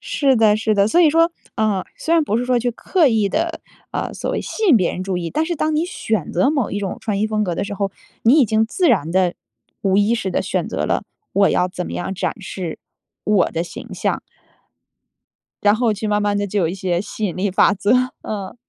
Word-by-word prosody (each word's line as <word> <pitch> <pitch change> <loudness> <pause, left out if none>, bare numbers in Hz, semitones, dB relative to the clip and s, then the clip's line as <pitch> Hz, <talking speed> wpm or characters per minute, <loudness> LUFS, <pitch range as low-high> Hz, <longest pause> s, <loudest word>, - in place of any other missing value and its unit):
是 270 -3 +1
的， 215 -1 +4
是 215 0 +1
的。 200 0 +3
所 345 - +4
以 320 -4 +6
说， 330 +2 +3 0.2
呃， 210 -4 +1
虽 330 - 0
然 330 - +4
不 220 -4 0
是 245 - -1
说 250 -1 +2
去 245 +1 0
刻 315 +7 +2
意 220 -4 +2
地， 330 +5 -2 0.3
呃， - - -3
所 - - -3
谓 - - -1
吸 440 - -4
引 280 - +7
别 185 -5 +1
人 185 - -4
注 190 -1 -2
意， 170 -1 -4
但 310 - 0
是 345 -2 -2
当 310 +1 0
你 315 +3 +1
选 220 - -2
择 270 - +3
某 275 -7 0
一 205 - -2
种 195 -2 -4
穿 205 -3 -2
衣 215 - +2
风 215 -1 0
格 175 -3 -2
的 - - -2
时 205 - -5
候， 200 -1 -1 0.3
你 235 +5 +5
已 - - +6
经 220 0 +2
自 355 - +1
然 165 - +2
地、 185 -1 +2 0.5
无 195 -1 +2
意 205 +3 +3
识 195 -5 -2
地 - - 0
选 - - -2
择 - - -2
了 - - 0 0.3
我 200 0 +4
要 180 - +2
怎 180 -1 -5
么 - - -6
样 190 - -3
展 205 +4 -3
示 180 -4 -5 0.5
我 205 -4 +3
的 165 - -2
形 175 - -9
象。 - - -1 1.4
然 205 0 +5
后 230 -1 +1
去 210 +2 -4
慢 210 0 +1
慢 205 0 +1
地 205 - 0
就 205 +1 -1
有 165 - +2
一 175 - -3
些 180 -2 -1
吸 215 +1 -7
引 180 - -3
力 200 +1 0
法 195 - +4
则， 205 +2 0 0.3
嗯。 200 -1 -5
210 Hz, 265 characters per minute, -20 LUFS, 190-245 Hz, 1.4 s, 引